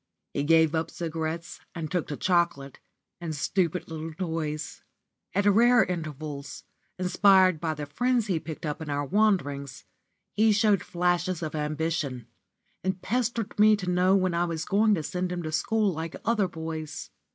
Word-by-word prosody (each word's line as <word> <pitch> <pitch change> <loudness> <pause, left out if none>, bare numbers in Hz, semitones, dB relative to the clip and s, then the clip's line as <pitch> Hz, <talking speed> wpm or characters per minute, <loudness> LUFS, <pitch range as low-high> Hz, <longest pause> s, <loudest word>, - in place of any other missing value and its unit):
He - - -1
gave 160 +1 +4
up 160 0 -1
cigarettes 165 0 -4 0.2
and 160 -2 -5
took 180 -3 -1
to 145 - -5
chocolate, 170 -7 0 0.4
and 165 -3 -4
stupid 180 +3 0
little 160 -1 -6
toys. 160 -3 -4 0.5
At 200 +1 +2
rare 235 +4 +6
intervals, 155 -4 -5 0.3
inspired 185 -1 +4
by 160 -2 -1
the 150 -1 -5
friends 245 - +1
he 185 -6 0
picked 160 0 -7
up 150 +1 -3
in 155 - -6
our 145 0 -1
wanderings, 145 -8 0 0.5
he 220 0 +4
showed 205 -3 +3
flashes 175 0 0
of 155 - -4
ambition, 150 -4 -2 0.6
and 190 0 -1
pestered 230 -1 -1
me 215 0 +7
to 180 -3 -3
know 180 +2 +4
when 185 -2 +1
I 170 +1 +1
was 165 -1 -3
going 210 +1 +3
to 160 - -3
send 180 +3 -3
him 175 -1 -3
to 155 - -4
school 210 +4 +1
like 160 +1 -5
other 215 -4 +2
boys. 160 -2 -6
170 Hz, 165 wpm, -27 LUFS, 155-190 Hz, 0.6 s, me